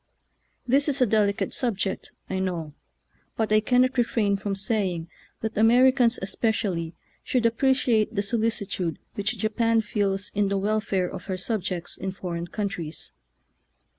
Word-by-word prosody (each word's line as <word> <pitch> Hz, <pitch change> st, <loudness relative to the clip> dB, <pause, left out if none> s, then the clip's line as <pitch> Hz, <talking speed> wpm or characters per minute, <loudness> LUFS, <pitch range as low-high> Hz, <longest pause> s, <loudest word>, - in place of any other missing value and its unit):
This 280 Hz, +4 st, +3 dB
is 280 Hz, -1 st, 0 dB
a 250 Hz, -, +5 dB
delicate 210 Hz, -2 st, +1 dB
subject, 205 Hz, -6 st, -2 dB, 0.2 s
I 190 Hz, -, -2 dB
know, 170 Hz, -5 st, -3 dB, 0.6 s
but 220 Hz, -1 st, +1 dB
I 215 Hz, -, +6 dB
cannot 250 Hz, +3 st, +2 dB
refrain 225 Hz, -4 st, +2 dB
from 200 Hz, 0 st, -3 dB
saying 195 Hz, -4 st, -1 dB, 0.3 s
that 220 Hz, -, -2 dB
Ameri 245 Hz, +4 st, +5 dB
cans 245 Hz, -3 st, +3 dB
especially 190 Hz, -5 st, -1 dB, 0.3 s
should 250 Hz, -3 st, 0 dB
appreciate 230 Hz, -2 st, +2 dB
the 200 Hz, -, +1 dB
so 210 Hz, +4 st, 0 dB
licitude 200 Hz, -6 st, -1 dB, 0.2 s
which 210 Hz, +4 st, -2 dB
Japan 225 Hz, +2 st, +2 dB
feels 200 Hz, -2 st, -1 dB
in 205 Hz, 0 st, +2 dB
the 200 Hz, -, 0 dB
w 200 Hz, +2 st, 0 dB
r 215 Hz, -, +2 dB
elfare 190 Hz, -3 st, 0 dB
of -, -, -8 dB
her 190 Hz, -2 st, -3 dB
subjects 185 Hz, -3 st, -3 dB
in 190 Hz, 0 st, -4 dB
foreign 175 Hz, -3 st, -4 dB
countries. 180 Hz, -5 st, -4 dB
210 Hz, 155 wpm, -25 LUFS, 190-230 Hz, 0.6 s, I